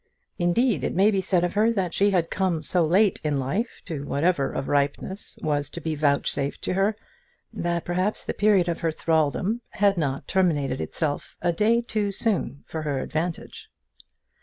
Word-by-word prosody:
Indeed 175 - +2
it - - -1
may 200 +4 +5
be 195 -2 +1
said 185 -2 +1
of 175 - 0
her, 220 +3 +3
that 185 -5 -1
she 200 +1 +3
had 175 -4 +1
come 180 -4 0
so 175 +3 +1
late 190 +6 +3
in 150 -2 0
life 185 - -2
to 150 -4 -5
whatever 145 +1 +1
of 135 - -4
ripeness 145 +7 -1
was 145 -2 0
to - - -7
be 160 -1 -2
vouchsafed 140 -1 0
to - - -1
her, 195 +3 +2 0.6
that 170 -1 -2
perhaps 185 +4 -1
the - - -2
period 205 -4 +3
of 170 -1 -1
her 165 - 0
thraldom 160 +8 0
had 200 -3 +2
not 140 -3 -2
terminated 150 -8 +1
itself 150 -3 -3
a 175 - +3
day 225 +6 +3
too 215 -4 -1
soon 195 -8 -1
for 160 - -5
her 145 -3 -1
advantage. 165 +4 -4
175 Hz, 180 wpm, -25 LUFS, 150-200 Hz, 0.6 s, may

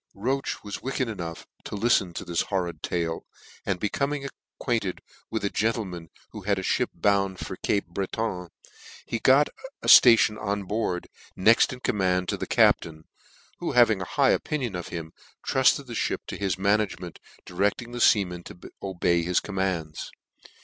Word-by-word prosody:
Roche 130 +7 -2
was 105 -1 -6
wicked 130 -1 -2
enough 85 -7 -6 0.2
to - - -6
liften 100 -4 +2
to - - -5
this 85 -1 0
hor 95 -2 -1
rid 85 -1 -7
tale, 85 -2 -2 0.4
and 95 -2 0
becoming 140 +7 -1 0.3
acquainted 115 -7 -1 0.3
with 110 -2 -2
a - - +1
gentle 115 0 0
man 85 -3 -8 0.2
who 105 - -8
had 100 +1 0
a 95 - -3
fhip - - +1
bound 100 -2 +1
to - - -6
Cape 100 - 0
Breton, 95 +1 -3 0.6
he 115 - -3
got 135 +5 +5 0.3
a - - -4
ftation 110 -3 +7
on 100 -1 -2
board, 95 -2 -2 0.3
next 110 +5 +5
in 125 -1 -8
command 90 -5 0
to - - -1
the - - -5
captain, 80 -1 +2 0.6
who - - -3
having 115 -4 +5
an 90 - -4
high - - +3
opinion 130 -10 -1
of 90 - -5
him, 80 -2 -6 0.3
trufted 130 +1 +3
the 120 - -8
Ihip - - -2
to - - -4
his 95 -3 -1
management, 100 -3 0 0.3
directing 100 +6 -1
the 120 - -5
feamen 90 -7 +3
to 90 - -11 0.2
obey 90 -3 +1
his 90 +1 +1
commands. 95 -6 -3
100 Hz, 170 wpm, -26 LUFS, 90-115 Hz, 0.6 s, ftation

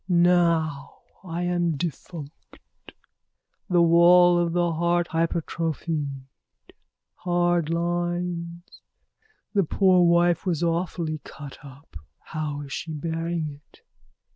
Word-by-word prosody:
Now 170 -5 +2 0.2
I 175 -1 -4
am 175 -3 0
defunct, 155 0 -7 1.1
the 175 -2 +4
wall 175 +1 +6
of 170 -1 0
the 175 -1 +1
heart 170 +1 0
hypertrophied. 160 -3 -2 0.9
Hard 175 -2 +1
lines. 175 0 -3 0.7
The 200 -2 +3
poor 185 +1 +3
wife 170 0 +3
was 175 -3 -1
awfully 165 -2 -1
cut 145 -2 -10
up. 140 +2 -15 0.2
How 150 -2 -5
is 140 -1 -8
she 160 - -5
bearing 160 -1 -3
it? - - -24
170 Hz, 100 wpm, -25 LUFS, 155-175 Hz, 1.1 s, wall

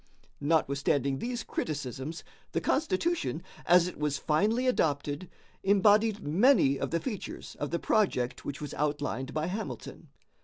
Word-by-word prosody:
Notwithstanding 140 -3 +1
these 240 0 -3
criticisms, 145 +1 -4 0.3
the - - +2
Constitution, 315 - 0 0.2
as 175 0 +6
it 180 - -7
was 150 -2 0
finally 210 - +1
adopted, 150 - 0 0.3
embodied 205 +2 +4
many 160 - +4
of - - -2
the 170 - 0
features 215 -4 -6
of 145 - -2
the 170 - 0
project 170 - +1
which 140 -1 -5
was 145 - -5
outlined 145 -3 -2
by 155 +1 -1
Hamilton. 200 +6 -5
160 Hz, 130 wpm, -29 LUFS, 145-210 Hz, 0.3 s, as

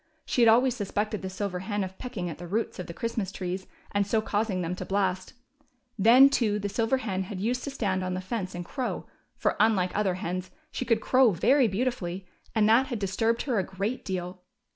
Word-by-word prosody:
She 245 - 0
had 230 - +7
always 245 +2 +4
suspected 210 0 -2
the 190 - -4
silver 185 -1 -3
hen 205 +1 -2
of 190 0 -7
pecking 240 -8 -4
at 165 -2 -6
the 175 - -7
roots 210 +2 -2
of 180 - -5
the 170 - -6
Christmas 225 -3 -2
trees 185 0 -4 0.2
and 200 -1 +1
so 220 +2 +2
causing 205 -3 -1
them 170 +2 -2
to - - -4
blast; 190 0 -1 0.6
then, 235 +6 +8
too, 225 -6 +1
the 205 -1 -3
silver 230 +5 +1
hen 190 -7 -2
had 190 0 -6
used 245 +5 -1
to - - -3
stand 195 -9 -1
on 185 0 -2
the - - -2
fence 185 -1 -4
and 175 0 -5
crow; 255 +6 -3 0.3
for, - - 0
unlike 205 -4 +3
other 195 -3 +1
hens, 185 0 -4 0.2
she 255 - -3
could 230 -2 +2
crow 255 +1 +5
very 250 - +4
beautifully, 195 -4 -2 0.3
and 215 -1 +4
that 235 +5 +5
had 245 - -3
disturbed 225 +4 0
her 245 -7 0
a - - +1
great 200 +7 -3
deal. 185 -1 -4
205 Hz, 215 wpm, -27 LUFS, 185-230 Hz, 0.6 s, then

